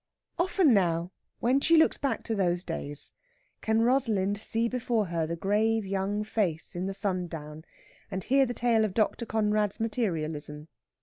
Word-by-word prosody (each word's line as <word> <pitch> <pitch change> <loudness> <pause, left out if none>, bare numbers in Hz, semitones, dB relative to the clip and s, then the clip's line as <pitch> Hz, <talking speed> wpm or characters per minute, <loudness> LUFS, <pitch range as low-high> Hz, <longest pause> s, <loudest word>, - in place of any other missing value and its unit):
Often 355 -5 +3
now 175 -3 +1 0.3
when 255 +4 +3
she 330 +4 +4
looks 320 - +4
back 275 - -1
to 225 - -2
those 180 -4 0
days 145 -4 -5 0.5
can 220 +1 +2
Rosalind 220 -6 +2
see 225 +2 0
before 235 -3 0
her 165 -2 0
the 170 - -3
grave 215 +4 +1
young 195 +2 -1
face 190 -8 -1
in 180 +2 -2
the 195 - -4
sundown, 165 -6 -4 0.4
and 190 - -4
hear 270 0 +3
the 245 - -4
tale 235 -2 +2
of 210 -3 -2
Dr. 225 +1 0
Conrad's 210 -2 0
materialism. 160 - -2
210 Hz, 160 wpm, -28 LUFS, 175-230 Hz, 0.5 s, she